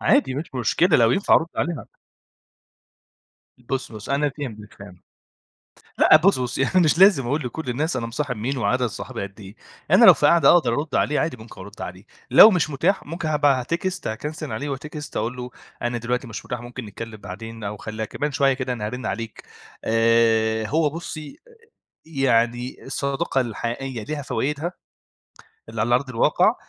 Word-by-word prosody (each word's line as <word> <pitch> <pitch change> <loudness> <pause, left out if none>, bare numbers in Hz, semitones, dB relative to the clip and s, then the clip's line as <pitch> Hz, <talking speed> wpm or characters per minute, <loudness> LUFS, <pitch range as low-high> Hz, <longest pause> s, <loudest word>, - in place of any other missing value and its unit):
عادي 270 - +2
مش 145 0 -6
مشكلة 130 +8 +3
لو 115 -1 +4
ينفع 195 - +3
أرد 165 - +3
عليه 175 - 0
ها 125 -9 -9 1.7
بُصي، 125 0 -4
بُصي، 110 +6 -3
أنا 145 +1 +1
فِهمتِك، 110 -7 -7
فِهمتِ 100 -3 -13 1.0
لأ - - +7
بُصي، 160 -2 +3
بُصي، 125 +2 -2
يعني 185 +6 +2
مش 155 +2 +2
لازم 190 -10 +6
أقول 145 +5 -1
لكل 130 +4 -5
الناس 150 +5 -1
أنا 115 -2 -2
مصاحب 125 +2 -3
مين 125 +6 -3
وعدد 125 +3 +1
صحابي 105 - -6
قد 100 +2 -8
إيه، 100 +1 -12 0.3
أنا - - +7
لو - - +10
في - - +2
قعدة 165 -5 +6
أقدر 155 -9 +4
أرُدّ 145 +3 -3
عليه 150 - +1
عادي 165 -5 -1
ممكن 110 -3 -13
أرُدّ 100 +3 -11
عليه، 90 +2 -8 0.3
لو 220 - +10
مش 170 -6 0
مُتاح 170 +8 0
ممكن 165 +1 -4
هاب 150 -1 -1
أتكست 165 +8 0
هاكَنسِل 150 +7 -5
عليه 145 - -4
وأتكست 150 +2 -7
أقول 115 +4 -2
له 125 0 -6 0.3
أنا 120 0 -1
دلوقتي 125 +2 -2
مش 115 -2 -7
مُتاح، 125 -3 -4
ممكن 120 0 -8
نتكلم 110 +2 -8
بعدين 110 +3 -9
أو 100 +1 -4
خلّيها 110 +1 -5
كمان 145 +6 -3
شوية 135 0 +3
كده 130 -1 -3
أنا 110 -4 -4
هارِنّ 120 +1 -5
عليك. 115 -1 -5 0.4
آآ، 115 -1 +2
هو 155 +5 +1
بُصي 155 - -8 0.7
يعني 125 -4 0
الصداقة 140 +1 -1
الحقيقية 120 +1 -4
ليها 150 +5 -4
فوايدها 150 +5 -2 1.0
اللي 115 -1 -5
على 120 +3 +2
أرض 130 +2 +1
الواقع 115 - +3
125 Hz, 175 wpm, -23 LUFS, 115-150 Hz, 1.7 s, لو